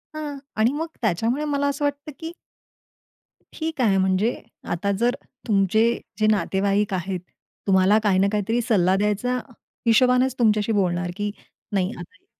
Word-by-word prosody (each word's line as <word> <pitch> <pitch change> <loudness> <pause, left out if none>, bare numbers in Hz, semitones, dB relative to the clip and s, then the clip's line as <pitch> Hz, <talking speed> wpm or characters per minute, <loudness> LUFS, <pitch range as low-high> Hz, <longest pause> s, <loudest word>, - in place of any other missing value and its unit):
हं. 295 -2 -5 0.2
आणि 225 +4 +3
मग 320 +3 -2
त्याच्यामुळे 230 - 0
मला 285 -1 0
असं 285 +1 -2
वाटतं 285 +1 -3
की 325 0 -5 1.2
ठीक 315 -4 -3
आहे, 200 -5 +3
म्हणजे 190 +4 +1 0.3
आता 190 +4 0
जर 240 +1 +2 0.3
तुमचे 200 +1 +3 0.4
जे 215 - +3
नातेवाईक 200 0 +1
आहेत, 185 0 -2 0.5
तुम्हाला 190 +3 +4
काही 195 -3 +3
ना 195 - +4
काहीतरी 220 +3 0
सल्ला 190 -5 +2
द्यायचा 210 +5 0 0.5
हिशोबानेच 250 +2 +4
तुमच्याशी 215 -1 +2
बोलणार 180 -3 0
की 205 0 -2 0.4
नाही 190 -2 +1
आता - - -7
नाही 205 - -28
210 Hz, 145 wpm, -23 LUFS, 195-250 Hz, 1.2 s, तुम्हाला